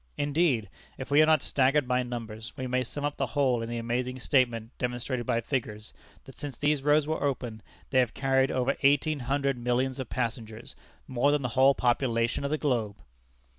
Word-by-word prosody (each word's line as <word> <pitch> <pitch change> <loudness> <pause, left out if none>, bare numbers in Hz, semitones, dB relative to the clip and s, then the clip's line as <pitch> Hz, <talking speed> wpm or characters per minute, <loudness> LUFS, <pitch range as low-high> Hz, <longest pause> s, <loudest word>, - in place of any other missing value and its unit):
Indeed, 145 - +1 0.3
if 130 - -7
we 145 +2 +6
are 155 - +5
not 155 -3 +4
staggered 135 +1 +2
by 125 0 +2
numbers, 115 -2 -6
we 130 - -4
may 125 0 0
sum 145 +4 -5
up 145 - -3
the - - -1
whole 130 -5 +1
in 115 - -5
the 120 - -3
amazing 125 +2 -2
statement 120 -3 0
demonstrated 125 0 -3
by 115 - +1
figures, 110 -4 -4 0.3
that 135 - -14
since 140 -5 -6
these 145 -1 +1
roads 150 +1 +3
were 155 -1 -2
opened, 125 -6 -2 0.3
they 130 - +4
have 125 -3 +1
carried 135 -1 +2
over 130 +1 0
eighteen 145 +2 +3
hundred 135 0 -1
millions 125 +2 0
of 130 - -5
passengers, 115 -2 -4 0.3
more 130 +3 +2
than 145 -1 +1
the 125 - -1
whole 135 +3 +4
population 120 -1 +1
of 140 - -1
the 155 - 0
globe! 120 -9 -1
130 Hz, 195 wpm, -28 LUFS, 120-140 Hz, 0.3 s, we